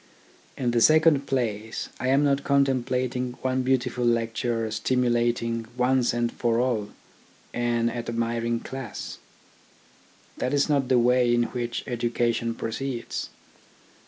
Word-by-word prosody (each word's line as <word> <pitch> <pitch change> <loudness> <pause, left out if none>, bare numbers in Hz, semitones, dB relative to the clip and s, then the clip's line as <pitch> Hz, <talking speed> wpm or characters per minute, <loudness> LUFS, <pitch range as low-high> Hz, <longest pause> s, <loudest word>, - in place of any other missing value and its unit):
In 125 -3 0
the 120 -1 +2
second 155 -1 +5
place, 110 -4 -2
I 130 - -2
am 135 +2 +4
not 140 -1 +2
contemplating 130 -2 +1
one 130 0 +1
beautiful 125 -1 0
lecture 115 -1 0
stimulating, 120 0 0
once 125 0 +2
and 120 0 0
for 115 -1 0
all, 120 -5 0 0.6
an 120 -1 +1
admiring 115 0 -2
class. 130 -5 -7 1.2
That 130 +3 -1
is 140 - +3
not 140 -4 +1
the 130 -1 +4
way 125 0 +4
in 120 0 +3
which 120 -1 -3
education 120 -1 -1
proceeds'. 120 +1 -4
120 Hz, 120 wpm, -26 LUFS, 115-130 Hz, 1.2 s, second